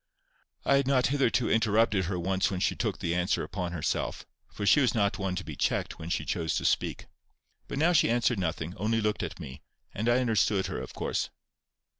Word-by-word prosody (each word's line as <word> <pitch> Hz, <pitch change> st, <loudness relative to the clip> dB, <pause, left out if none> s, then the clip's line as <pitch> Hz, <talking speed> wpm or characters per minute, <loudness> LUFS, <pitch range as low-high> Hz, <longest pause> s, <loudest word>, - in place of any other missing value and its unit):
I 140 Hz, -, +4 dB
had 140 Hz, -1 st, +1 dB
not 130 Hz, -2 st, +3 dB
hitherto 130 Hz, -4 st, +2 dB
interrupted 110 Hz, -3 st, +2 dB
her 90 Hz, +1 st, -2 dB
once 95 Hz, +1 st, 0 dB
when 95 Hz, -2 st, -3 dB
she -, -, +1 dB
took 110 Hz, -7 st, -2 dB
the 85 Hz, -2 st, -2 dB
answer 90 Hz, +3 st, 0 dB
upon 90 Hz, -1 st, -4 dB
herself, 85 Hz, -3 st, -2 dB, 0.2 s
for 100 Hz, -, -5 dB
she 145 Hz, -, +6 dB
was 125 Hz, -, +2 dB
not 100 Hz, -2 st, +1 dB
one 95 Hz, -2 st, -1 dB
to 90 Hz, -, -3 dB
be 75 Hz, -, -7 dB
checked -, -, -1 dB
when 80 Hz, -, -6 dB
she 75 Hz, -, -1 dB
chose 80 Hz, +2 st, -1 dB
to -, -, -2 dB
speak. -, -, 0 dB, 0.6 s
But -, -, -5 dB
now 165 Hz, +5 st, +3 dB
she 160 Hz, -, +4 dB
answered 120 Hz, -1 st, +2 dB
nothing, 85 Hz, 0 st, -3 dB
only 110 Hz, +2 st, 0 dB
looked 105 Hz, -1 st, 0 dB
at -, -, -5 dB
me, 65 Hz, -, -9 dB, 0.3 s
and 110 Hz, +4 st, -1 dB
I 120 Hz, -, +4 dB
understood 110 Hz, -5 st, +2 dB
her, -, -, -4 dB
of -, -, -9 dB
course. -, -, -2 dB
100 Hz, 210 wpm, -29 LUFS, 90-115 Hz, 0.6 s, she